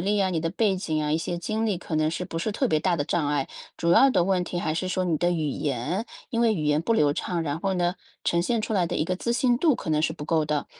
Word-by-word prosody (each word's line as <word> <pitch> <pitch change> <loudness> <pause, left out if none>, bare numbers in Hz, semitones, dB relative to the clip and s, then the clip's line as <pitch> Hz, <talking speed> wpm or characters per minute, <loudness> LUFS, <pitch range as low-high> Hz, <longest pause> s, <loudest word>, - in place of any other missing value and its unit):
历 205 +3 +1
啊， 190 -1 +2
你 165 -3 -1
的 165 +1 -1
背 200 0 +1
景 155 -4 -2
啊， 150 - -1
一 - - +3
些 175 +1 -3
经 220 +5 -2
历 205 -5 0
可 170 - -6
能 155 0 +2
是 180 +2 -3
不 165 - -5
是 215 - -1
特 260 +6 0
别 155 - +2
大 180 +1 +1
的 145 - -1
障 145 0 0
碍。 145 -2 0 0.3
主 170 0 +2
要 270 +9 +6
的 175 -9 +2
问 190 -1 +1
题 175 - -4
还 155 -2 -1
是 185 +2 -2
说 185 0 0
你 170 -3 +1
的 175 +3 +1
语 160 -4 0
言， 145 - -2 0.3
因 230 -3 0
为 230 -2 +4
语 155 -6 -2
言 150 +1 +2
不 230 - +1
流 150 -10 +3
畅， 170 +2 -2
然 155 0 -3
后 195 0 0
呢 175 0 +1 0.3
呈 170 0 +2
现 230 +5 0
出 220 - -3
来 185 -4 +2
的 - - -3
一 - - +1
个 180 - -1
自 235 +5 -1
信 240 0 +2
度 305 0 +3
可 - - -7
能 155 0 +2
是 - - +1
不 150 - -8
够 160 -1 +1
的。 150 -1 -1
175 Hz, 335 characters per minute, -25 LUFS, 155-195 Hz, 0.3 s, 要